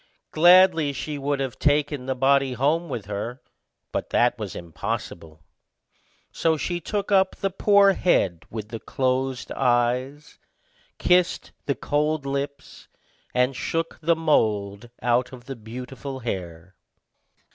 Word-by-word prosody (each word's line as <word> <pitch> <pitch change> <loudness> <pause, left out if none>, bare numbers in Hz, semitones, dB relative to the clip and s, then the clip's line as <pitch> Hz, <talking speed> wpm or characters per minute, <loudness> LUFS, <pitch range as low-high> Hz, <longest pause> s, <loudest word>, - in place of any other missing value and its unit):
Gladly 175 -1 +6
would 140 - -3 0.4
she 135 - -1
have 130 -3 -6
taken 145 -2 +1
the 130 - -1
body 135 0 +3
home 155 +7 0
with 115 -6 -4
her; 105 +5 -5 0.5
but - - -3
that 120 0 +3
was 105 -4 -5
impossible; 85 -2 -6 0.9
so 160 -1 +1
she 175 +3 -2
took 205 +4 -3
up 190 -1 +3
the 195 - -2
poor 200 +1 +5
head 95 - +1
with 110 -1 -6
the 115 - -6
closed 130 0 -2
eyes, 125 +3 0 0.6
kissed 180 0 +2 0.2
the 140 - +1
cold 150 0 -1
lips, 140 0 -5 0.5
and 125 +1 +2
shook 165 +5 -3
the 165 +1 +3
mould 110 -9 0
out 120 +1 +1
of 125 -2 -12
the 135 +1 -6
beautiful 130 +4 -8
hair. 90 -5 -6
135 Hz, 130 wpm, -24 LUFS, 115-155 Hz, 0.9 s, Gladly